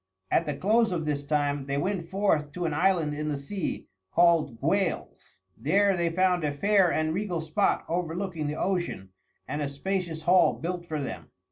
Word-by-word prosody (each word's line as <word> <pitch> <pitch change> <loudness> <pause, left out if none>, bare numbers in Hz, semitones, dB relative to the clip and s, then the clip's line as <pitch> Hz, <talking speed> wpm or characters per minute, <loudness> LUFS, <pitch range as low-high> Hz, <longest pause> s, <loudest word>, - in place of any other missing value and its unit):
At - - +2
the 150 - -1
close 220 +2 +2
of 165 -3 -2
this 145 -1 -1
time 145 -1 0
they 140 0 -1
went 175 +1 -2
forth 190 -7 +1
to 175 +1 -3
an 160 - -1
island 165 -2 +2
in 150 +1 -3
the 145 - -1
sea 170 +7 -4 0.2
called 165 - +3
Gwales. 170 - -2
There 195 - +2
they 170 -1 +1
found 180 0 +2
a 150 - +1
fair 195 +4 +3
and 155 0 0
regal 185 -2 -2
spot 160 -1 0
overlooking 170 -1 -2
the 150 - -2
ocean 175 - -2 0.4
and 145 +3 -3
a 145 - -1
spacious 165 +2 -3
hall 180 +1 +5
built 175 +1 -5
for 155 -2 -3
them. 140 - -6
165 Hz, 180 wpm, -27 LUFS, 150-185 Hz, 0.4 s, hall